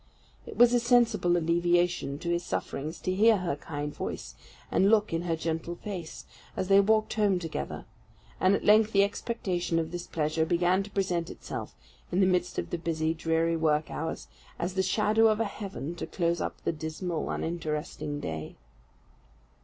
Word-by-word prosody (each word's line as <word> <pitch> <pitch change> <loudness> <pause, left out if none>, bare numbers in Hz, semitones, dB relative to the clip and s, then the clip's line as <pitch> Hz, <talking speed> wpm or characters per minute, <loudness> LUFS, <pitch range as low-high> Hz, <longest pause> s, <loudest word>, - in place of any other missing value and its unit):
It - - -8
was 240 0 +6
a 245 - +5
sensible 230 -7 +3
alleviation 175 -3 +1
to 170 - -5
his 170 0 0
sufferings 160 -2 -4
to 185 - -1
hear 220 +3 +5
her 180 -5 -2
kind 145 0 -5
voice, - - -5 0.4
and 195 - +4
look 210 -4 +3
in 165 - 0
her 170 -2 -1
gentle 165 +1 -3
face, 175 -4 -7 0.3
as 185 - -2
they 195 0 +7
walked 215 +2 +3
home 205 -3 +2
together; 165 - -5 0.5
and 190 +2 +4
at - - -3
length 215 +1 +5
the 200 0 +6
expectation 190 -5 -2
of 160 -1 -1
this 175 0 -5
pleasure 155 0 0
began 175 +3 +2
to 200 - -7
present 180 -4 -1
itself, - - -7 0.4
in 180 - +1
the 195 - +5
midst 180 -1 +1
of - - -3
the 175 - -2
busy, 160 -1 0
dreary 165 0 +1
work 155 -1 +1
hours, 160 +1 -4 0.3
as 175 +2 -2
the 190 - +1
shadow 215 +3 +3
of 215 0 +2
a 225 - +2
heaven 195 -6 -5
to - - -4
close 170 -2 0
up - - -4
the - - +1
dismal, 160 +2 -4
uninteresting 155 -3 -3
day. 80 - -5
175 Hz, 175 wpm, -28 LUFS, 160-200 Hz, 0.5 s, they